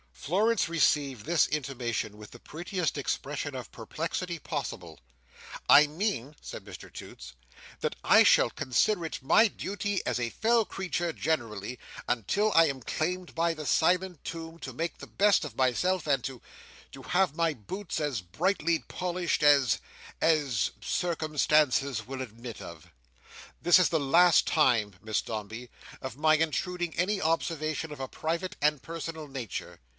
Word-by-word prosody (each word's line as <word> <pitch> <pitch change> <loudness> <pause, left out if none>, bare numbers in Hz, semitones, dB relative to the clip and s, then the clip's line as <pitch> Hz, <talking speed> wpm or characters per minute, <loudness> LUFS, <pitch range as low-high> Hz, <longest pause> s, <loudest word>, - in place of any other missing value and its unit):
Florence 205 - +1
received 145 -8 +1
this 170 -2 +3
intimation 125 -7 -3
with 105 -1 -11
the - - -12
prettiest 175 +4 -3
expression 145 0 -3
of 125 - -7
perplexity 165 - -4
possible. 90 - -5 0.7
"I 150 +1 +8
mean," 155 - -2
said - - -8
Mr - - -11
Toots, - - -10 0.5
"that - - -1
I - - +7
shall - - +5
consider 170 - +1
it 160 - -5
my 220 +11 +6
duty 205 0 -3
as - - 0
a 120 -1 -1
fellow 230 - +2
creature 180 -4 -3
generally, 120 -8 -3 0.3
until 160 - +1
I 165 0 +7
am 135 -3 -3
claimed 180 +8 -3
by 165 0 +1
the 155 -1 -7
silent 180 +1 +1
tomb, 165 0 -7
to - - -7
make 165 +2 -4
the - - -9
best 205 -2 +3
of 145 -7 -7
myself, 155 +9 +1
and 135 -4 +2
to—to 135 +1 -11
have 180 -2 +1
my 165 -1 +1
boots 170 - -5
as 145 -9 -1
brightly 160 - 0
polished, 180 -2 -2
as—as—circumstances 145 - +1
will 135 0 -5
admit 115 -1 -8
of. 85 -3 -11 0.7
This 175 - +6
is 180 - +4
the 160 - +1
last 170 +5 +5
time, 115 - +2
Miss 110 -1 -1
Dombey, 110 +3 -6 0.3
of 130 -2 -6
my 155 +1 +4
intruding 170 +2 -1
any 195 +4 +1
observation 160 -1 -1
of 145 - -8
a 135 - -3
private 165 +6 -3
and 150 -2 +2
personal 165 -1 -6
nature. 130 -7 -6
155 Hz, 145 wpm, -29 LUFS, 130-175 Hz, 0.7 s, I